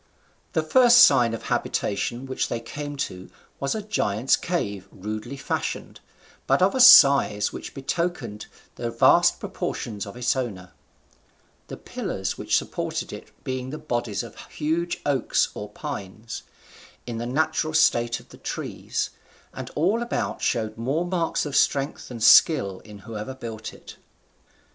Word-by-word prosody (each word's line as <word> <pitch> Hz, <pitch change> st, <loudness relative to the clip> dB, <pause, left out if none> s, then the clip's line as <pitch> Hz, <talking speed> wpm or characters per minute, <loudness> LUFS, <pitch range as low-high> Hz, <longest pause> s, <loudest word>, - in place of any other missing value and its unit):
The 160 Hz, -, +1 dB
first 245 Hz, +8 st, +7 dB
sign 120 Hz, -2 st, +5 dB
of -, -, -9 dB
habitation 120 Hz, +5 st, -2 dB
which 130 Hz, 0 st, -2 dB
they 115 Hz, -, -3 dB
came 145 Hz, +5 st, -6 dB
to 90 Hz, 0 st, -10 dB, 0.3 s
was 140 Hz, +6 st, -1 dB
a 215 Hz, -, -4 dB
giant's 120 Hz, -, +1 dB
cave 105 Hz, -, -3 dB
rudely 110 Hz, +7 st, -6 dB
fashioned, 135 Hz, -, -4 dB, 0.5 s
but 135 Hz, -, +3 dB
of 185 Hz, +2 st, +3 dB
a 260 Hz, -, -1 dB
size 140 Hz, -, +7 dB
which -, -, -8 dB
betokened 135 Hz, -6 st, -3 dB, 0.3 s
the 120 Hz, -, -3 dB
vast 115 Hz, 0 st, +4 dB
proportions 105 Hz, -4 st, -4 dB
of 100 Hz, -, -9 dB
its 125 Hz, +2 st, +1 dB
owner; 100 Hz, -9 st, -4 dB, 1.0 s
the -, -, -7 dB
pillars -, -, -4 dB
which -, -, +1 dB
supported -, -, -3 dB
it -, -, -9 dB
being 130 Hz, 0 st, -4 dB
the 150 Hz, -, -5 dB
bodies 120 Hz, -6 st, -2 dB
of -, -, -11 dB
huge 165 Hz, +3 st, -2 dB
oaks 140 Hz, -4 st, +1 dB
or 105 Hz, -, -7 dB
pines, 110 Hz, -3 st, -7 dB, 0.6 s
in 120 Hz, -2 st, -5 dB
the 120 Hz, -, -3 dB
natural 155 Hz, +3 st, 0 dB
state 120 Hz, -5 st, +3 dB
of -, -, -19 dB
the -, -, -14 dB
tree, -, -, -6 dB, 0.6 s
and -, -, -7 dB
all 195 Hz, +10 st, +2 dB
about 240 Hz, -, -3 dB
showed 110 Hz, -1 st, -1 dB
more 140 Hz, +9 st, 0 dB
marks 175 Hz, -3 st, -1 dB
of 145 Hz, -2 st, -4 dB
strength 140 Hz, 0 st, +1 dB
than 120 Hz, -2 st, -8 dB
skill 110 Hz, -, +5 dB
in 105 Hz, -1 st, -13 dB
whoever 115 Hz, +3 st, -6 dB
built 110 Hz, -3 st, -7 dB
it. -, -, -13 dB
130 Hz, 150 wpm, -24 LUFS, 110-155 Hz, 1.0 s, first